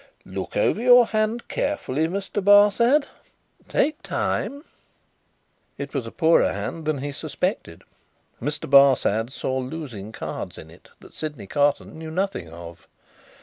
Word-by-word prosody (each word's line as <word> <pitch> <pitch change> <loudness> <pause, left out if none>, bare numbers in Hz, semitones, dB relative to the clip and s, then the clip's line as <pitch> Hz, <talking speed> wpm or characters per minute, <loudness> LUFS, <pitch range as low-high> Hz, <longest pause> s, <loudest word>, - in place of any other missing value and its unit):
"Look - - -5
over - - +2
your 245 0 +7
hand 220 +2 -1
carefully, 160 - -1
Mr. 195 +3 -3
Barsad. 210 +8 +5 0.6
Take 305 +1 0
time." 285 +1 -2 1.1
It 140 0 -6
was 130 -5 -3
a - - -7
poorer 165 -1 +3
hand 165 -2 -5
than 155 -1 0
he 145 +2 -4
suspected. 155 - -4 0.6
Mr. 145 +4 -3
Barsad 130 -4 +4
saw 130 0 -2
losing 130 -7 -6
cards - - -6
in - - -11
it - - -18
that - - -15
Sydney 150 -9 -6
Carton 145 +6 0
knew 160 0 -7
nothing 180 - -2
of. 85 0 -11
155 Hz, 135 wpm, -24 LUFS, 130-205 Hz, 1.1 s, your